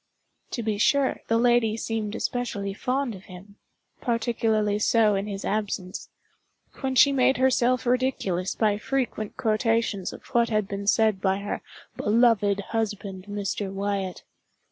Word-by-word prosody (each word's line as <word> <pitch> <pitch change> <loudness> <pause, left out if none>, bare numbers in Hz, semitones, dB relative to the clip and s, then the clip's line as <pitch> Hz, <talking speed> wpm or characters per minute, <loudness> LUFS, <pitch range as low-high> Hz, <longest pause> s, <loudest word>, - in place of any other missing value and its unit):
To 235 - -2
be 210 -2 -1
sure, 275 +4 +2
the 225 - +2
lady 235 -2 +3
seemed 220 -2 -3
especially 205 -7 -2
fond 255 +3 -1
of 190 -1 -11
him—particularly 215 +3 -2
so 215 -1 +3
in 195 +1 -1
his 200 -1 -5
absence—when 210 +6 -5
she 280 +2 +7
made 265 0 +3
herself 255 -1 +2
ridiculous 240 -8 0
by 210 -2 +1
frequent 240 -4 -2
quotations 220 -3 0
of - - -11
what 235 -1 +3
had 215 -3 0
been 200 0 -5
said 215 -3 +3
by 190 0 +2
her 200 +1 -4 0.4
"beloved 210 -2 +3
husband, 205 -4 -3
Mr. 205 -1 -3
Wyatt." 195 -1 -3
215 Hz, 130 wpm, -26 LUFS, 200-240 Hz, 0.4 s, she